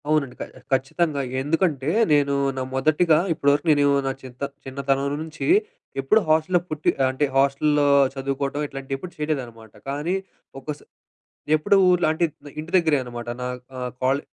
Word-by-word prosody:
అవునండి. 140 -5 +1
క - - -1 0.3
ఖచ్చితంగా 140 +3 0 0.2
ఎందుకంటే 150 -1 0 0.2
నేను 140 -1 +3 0.2
నా - - -1
మొదటిగా 155 +4 +3 0.2
ఇప్పటి 140 -3 +1
వరకు 145 - -1
నేను 145 -1 +4 0.2
నా - - +1
చిన్నతన్ 130 +2 -7
చిన్నతనం 135 +1 -1 0.2
నుంచి 160 0 -6 0.5
ఎప్పుడు 135 +11 +4
హాస్టల్లో 160 +3 +3
పుట్టి 155 -1 0 0.2
అంటే, 130 +3 0
హాస్టల్లో 140 +2 +3 0.3
చదువుకోటం 140 +1 -3
ఇట్లాంటివి 135 -1 -5
ఎప్పుడు 175 +6 -8
చేయలేదనమాట. 125 -8 -4 0.2
కానీ 150 +6 -1 0.4
ఒక 135 - -21
స - - -21 0.8
ఎప్పుడూ 155 +6 +3
ఊర్లో 180 -2 +3
అంటే 160 +2 0 0.4
ఇంటి 160 +2 -9
దగ్గరే 160 -4 +3
అనమాట. 120 -1 -7
నా - - -2 0.3
ఆహ్, 125 -1 -3
కాలే 135 +3 +2
140 Hz, 145 wpm, -23 LUFS, 135-155 Hz, 0.8 s, నేను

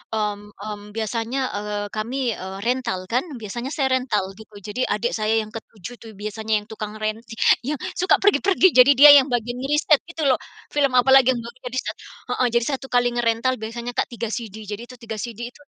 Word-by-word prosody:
mmm 210 -1 -1 0.2
mmm, 205 0 -7
biasanya, 225 +4 -2 0.2
eee, 205 0 -3
kami 240 +3 -1 0.3
rental 245 -6 0
kan, 250 +6 +2 0.2
biasanya 240 +5 -5
saya 275 -4 +1
rental 210 -7 -1
gitu, 220 -1 -14
jadi 245 +5 -3
adik 235 +3 -1
saya 215 +1 +1
yang 215 - -12
ke-7 220 0 -9
tuh 225 - -11
biasanya 215 +2 -4
yang - - -22
tukang 215 -1 -6
ren 215 0 0 0.5
yang 300 - 0 0.2
suka 365 - +4
pergi-pergi, 380 0 +4
jadi 265 +3 +9
dia 295 0 +11
yang 265 - 0
bagian 240 +1 -1
ngeriset 295 +2 +3
gitu 330 -2 -5
loh. 250 - +3 0.3
Film 280 -2 +2
apalagi 265 +1 +6
yang - - -3
belum 235 +2 -9
di 250 - -8
riset. - - -2 0.4
Heeh, 250 - +2
jadi 235 - +3
1 270 0 -9
kali 245 -1 +2
ngerental 235 +1 +1
biasanya 235 +2 -5
Kak - - +1
3 230 -2 -5
CD, 220 -4 -5
jadi 205 +2 -6
itu 255 - -12
3 220 -1 -5
CD 240 +1 -6
itu. - - -21
235 Hz, 195 wpm, -22 LUFS, 215-255 Hz, 0.5 s, dia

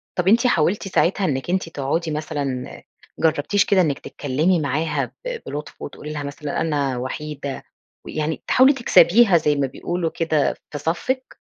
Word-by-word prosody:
طَب 180 0 -1
أنِت 235 +5 +5
حاولتِ 190 +1 +1
ساعتها 190 +1 +1
إنِك 135 -1 -2
أنتِ 185 -2 0
تقعدي 160 +3 -2
مثلًا 145 -4 -3
آآ - - -14 0.4
جرّبتيش 160 +5 +2
كده 190 -2 +4
إنِّك 150 -5 0
تتكلمي 155 +6 0
معاها 155 +2 -1 0.2
ب - - -3
بلُطف 150 +1 -7
وتقولي 150 +1 -7
لها 145 -1 -4
مثلًا 145 +2 -4
أنا 140 -5 0
وحيدة، 140 +2 -5 0.4
ويعني 155 +1 -3
تحاولي 265 +3 +6
تكسبيها 205 -5 +5
زي 150 -2 +1
ما 140 -1 0
بيقولوا 175 +5 -3
كده 160 -3 0 0.2
في 145 - -4
صفِّك؟ 175 - -2
155 Hz, 155 wpm, -22 LUFS, 145-180 Hz, 0.4 s, تحاولي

